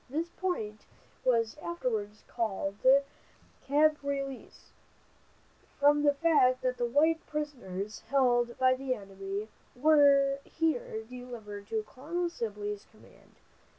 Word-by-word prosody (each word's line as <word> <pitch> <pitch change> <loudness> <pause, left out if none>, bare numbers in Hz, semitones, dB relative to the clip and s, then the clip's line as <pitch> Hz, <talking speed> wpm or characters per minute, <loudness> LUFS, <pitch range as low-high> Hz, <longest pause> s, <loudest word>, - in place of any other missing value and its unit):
This 320 +5 -2
point 225 - -3 0.4
was 230 -1 +2
afterwards 220 -11 -3
called 200 -3 -2 0.8
"Camp 300 +2 +3
Release," 275 -1 -5 1.1
from 290 +1 +5
the 290 -1 +3
fact 270 -5 +3
that 255 -1 0
the 240 - 0
white 320 +6 +3
prisoners 230 -10 -4
held 240 -3 +2
by 255 0 +4
the 260 0 -2
enemy 195 0 -6 0.3
were 280 -1 +5
here 275 -8 -2
delivered 225 -4 -9
to 220 -1 -1
Colonel 335 +10 -4
Sibley's 210 -6 -5
command. 220 - -21
255 Hz, 110 wpm, -30 LUFS, 220-290 Hz, 1.1 s, from